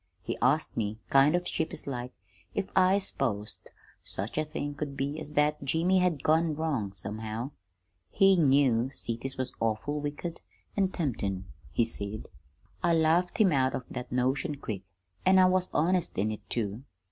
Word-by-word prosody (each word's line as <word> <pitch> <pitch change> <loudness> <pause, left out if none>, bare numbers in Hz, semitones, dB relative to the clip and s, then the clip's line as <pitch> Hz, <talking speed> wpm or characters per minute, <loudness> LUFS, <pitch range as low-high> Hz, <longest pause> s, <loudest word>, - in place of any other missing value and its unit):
He - - -2
asked 140 +6 +2
me, 110 -1 -2
kind 140 +4 +6
of 175 0 -1
sheepish 160 -1 -3
like, 125 -2 -4 0.4
if 195 -1 -2
I 190 +1 +5
s'posed 115 - -2 0.3
such 100 +4 -4
a 155 - +2
thing 150 -1 -4
could 145 -1 -5
be 140 +3 -2
as 150 -1 -7
that 150 0 +2
Jimmy 165 +7 +2
had 175 -6 +1
gone 160 0 +3
wrong, 145 -11 -1
somehow. 110 +6 -4 0.6
He 195 - +5
knew 135 -6 +4
cities 130 0 -4
was 130 -1 -2
awful 115 +7 -1
wicked 150 +3 -3 0.3
an' 195 -2 +3
temptin', 100 - -2 0.3
he 115 - +2
said. 105 -1 -5 0.5
"I 170 -1 +3
laughed 165 +3 +3
him 205 -5 +5
out 130 -2 +2
of 125 - -4
that 125 -1 -6
notion 130 +6 0
quick, 110 -8 -5 0.4
an' 190 0 +5
I 185 - +7
was 185 0 +2
honest 175 +2 +1
in 105 +3 +1
it, 105 - -8
too. 110 -1 -2
140 Hz, 165 wpm, -29 LUFS, 115-165 Hz, 0.6 s, I